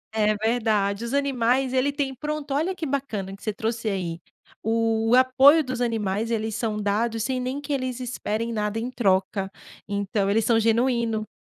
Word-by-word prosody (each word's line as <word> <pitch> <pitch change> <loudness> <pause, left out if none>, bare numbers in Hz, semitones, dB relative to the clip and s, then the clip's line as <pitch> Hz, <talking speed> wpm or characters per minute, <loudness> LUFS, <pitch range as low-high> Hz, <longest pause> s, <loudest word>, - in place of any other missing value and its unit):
É 215 -1 +3
verdade. 215 -2 0
Os 235 - -4
animais, 265 -2 +1
ele 260 +2 +2
tem 280 -2 -2
Pronto, 295 +1 -4
olha 325 +7 0
que 330 -3 -4
bacana 220 -9 -3
que - - -19
você 215 - -2
trouxe 225 +1 -2
aí. 175 -4 -3 0.4
O 225 +1 +2
apoio 265 +5 +6
dos 255 -2 -4
animais, 220 -2 -1
eles 220 -1 -1
são 220 0 -2
dados 220 +2 0
sem 260 -1 -1
nem 260 +3 -3
que 290 0 -4
eles 255 -2 -2
esperem 230 -2 -3
nada 210 0 -1
em 245 +2 -4
troca. 190 -3 +1 0.4
Então, 200 0 -1
eles 220 +1 +2
são 230 -1 +4
genuíno. 230 -1 +1
230 Hz, 175 wpm, -25 LUFS, 210-255 Hz, 0.4 s, apoio